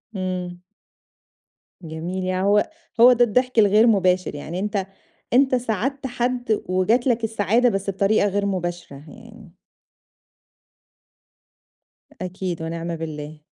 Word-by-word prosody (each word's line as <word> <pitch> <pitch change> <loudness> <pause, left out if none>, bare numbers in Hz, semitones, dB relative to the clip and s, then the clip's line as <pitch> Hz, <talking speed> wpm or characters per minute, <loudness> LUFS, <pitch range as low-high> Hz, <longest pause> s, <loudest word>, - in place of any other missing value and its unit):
إمم. 180 -1 -4 1.2
جميل. 170 +3 -5
يعني 185 +1 -1
هو 210 +7 +3 0.3
هو 250 +2 +8
ده 240 0 +4
الضحك 250 +1 +1
الغير 210 +3 +5
مباشر، 185 -6 +2
يعني 165 +5 -6
أنت 200 -1 -2 0.5
أنت 260 0 +4
ساعدت 250 +4 -2
حد، 245 -2 -1
وجات 210 +8 +1
لك 235 -2 +1
السعادة، 225 +3 +2
بس 195 -1 -2
بطريقة 200 +2 +2
غير 200 +1 -1
مباشرة 175 -6 -4
يعني. 225 -4 -14 2.7
أكيد، 180 -2 -4
ونِعْمَ 165 +1 -4
بالله. 155 -1 -7
200 Hz, 110 wpm, -22 LUFS, 180-230 Hz, 2.7 s, هو